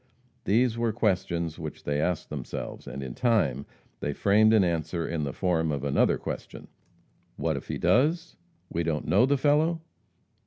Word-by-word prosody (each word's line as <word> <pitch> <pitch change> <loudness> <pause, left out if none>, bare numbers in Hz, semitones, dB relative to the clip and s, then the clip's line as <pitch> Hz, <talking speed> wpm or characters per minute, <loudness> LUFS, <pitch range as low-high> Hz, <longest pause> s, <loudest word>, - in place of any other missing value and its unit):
These 115 +2 +2
were 115 -1 +1
questions 85 -6 -1
which 80 -2 -7
they 75 0 -1
asked 90 0 -2
themselves, - - -6
and 70 +2 -6
in 65 -2 -6
time 75 - +1 0.3
they 75 - -2
framed 105 +6 +4
an 110 -3 +5
answer 85 -1 -1
in 80 -3 -2
the 70 - -3
form 80 -1 0
of 70 -2 -3
another 70 -1 +2
question, - - -7 0.7
"What - - -1
if - - -6
he - - -3
does? 160 +7 +2 0.3
We 85 - -2
don't 80 -2 -2
know 100 +10 +4
the 140 +1 +2
fellow?" 155 +4 +2
90 Hz, 165 wpm, -27 LUFS, 75-115 Hz, 0.7 s, an